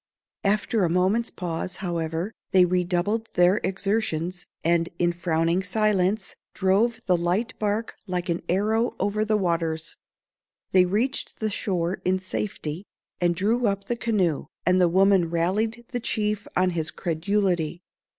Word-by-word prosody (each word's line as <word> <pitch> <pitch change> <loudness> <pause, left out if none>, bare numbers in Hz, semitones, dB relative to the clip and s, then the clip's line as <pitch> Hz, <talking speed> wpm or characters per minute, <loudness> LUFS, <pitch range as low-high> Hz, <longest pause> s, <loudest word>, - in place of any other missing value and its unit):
After 210 +1 +1
a 175 - +2
moment's 190 +7 +2
pause, 175 0 -4
however, 170 +2 -3 0.2
they 185 -1 +7
redoubled 180 +5 0
their 180 +4 +4
exertions, 185 -3 -1 0.2
and, 170 0 +2
in 175 0 +2
frowning 170 +1 +1
silence, 195 0 +1 0.2
drove 210 +4 +2
the 185 - +3
light 175 +7 0
bark 215 +2 -1
like 180 -1 -2
an 170 -1 -1
arrow 220 +6 +1
over 210 +1 +1
the 215 0 +2
waters. 165 -4 -1 0.7
They 185 -1 +6
reached 225 +9 -1
the 215 -1 -1
shore 180 -3 -1
in 185 +1 +2
safety, 185 -3 -4 0.4
and 175 -1 +2
drew 220 +6 +1
up 200 0 -1
the 240 - -1
canoe, 200 -10 0 0.2
and 185 +1 +4
the 175 - +5
woman 190 -1 +4
rallied 210 +8 0
the 245 - -2
chief 210 -3 -1
on 185 0 +3
his 160 -2 -1
credulity. 175 -1 -1
185 Hz, 140 wpm, -25 LUFS, 175-210 Hz, 0.7 s, they